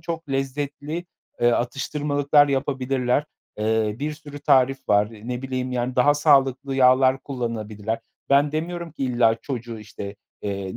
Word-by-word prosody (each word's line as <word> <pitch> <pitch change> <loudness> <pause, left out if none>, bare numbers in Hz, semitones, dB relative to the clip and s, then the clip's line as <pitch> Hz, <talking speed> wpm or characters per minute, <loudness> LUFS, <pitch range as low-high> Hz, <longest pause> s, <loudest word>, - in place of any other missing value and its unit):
çok 165 -1 -5
lezzetli, 145 +4 -3 0.4
eee, 120 - +5
atıştırmalıklar 145 +3 +2
yapabilirler. 135 0 0 0.3
Eee, 110 0 +1
bir 150 +2 -2
sürü 145 -1 -10
tarif 135 -1 +2
var. 105 0 +4
Eee, 110 +2 -11
ne 125 +1 -3
bileyim, 130 -1 -3
yani, 125 +1 -2
daha 145 +4 +5
sağlıklı 135 -2 +3
yağlar 130 0 +5
kullanabilirler. 110 -4 -3 0.3
Ben 140 +1 +4
demiyorum 170 +1 -3
ki, 140 - -3
illa 120 -3 +3
çocuğu, 120 -4 -5
işte, 100 -1 -8 0.3
eee, 100 -2 -4
130 Hz, 140 wpm, -23 LUFS, 120-145 Hz, 0.4 s, eee